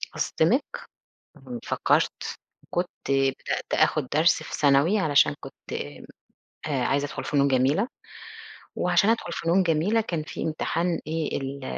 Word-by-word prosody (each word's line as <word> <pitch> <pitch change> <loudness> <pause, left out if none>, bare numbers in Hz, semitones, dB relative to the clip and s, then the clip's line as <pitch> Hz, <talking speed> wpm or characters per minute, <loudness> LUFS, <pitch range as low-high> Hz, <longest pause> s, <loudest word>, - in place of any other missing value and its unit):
أصدمِك؟ - - +2 0.7
م 125 -3 -8
فكّرت - - 0 0.3
كنت 175 +1 -1 0.2
بدأت 135 -1 0
آخُد 150 -4 +2
درس 155 +3 +3
في - - -9
ثانوي 145 +8 +4
علشان 145 - +4
كنت - - -11 0.9
آآ 135 -4 0
عايزة 140 +2 +1
أدخُل 145 - -6
فنون 140 -2 +2
جميلة 140 - +2 0.9
وعشان 210 - +2
أدخُل 225 -6 0
فنون 170 +3 +2
جميلة، 180 +7 +2
كان 170 -7 -3
في - - -6
امتحان 165 +2 -1
إيه 160 -1 -2
ال 135 0 -5
155 Hz, 125 wpm, -25 LUFS, 140-170 Hz, 0.9 s, ثانوي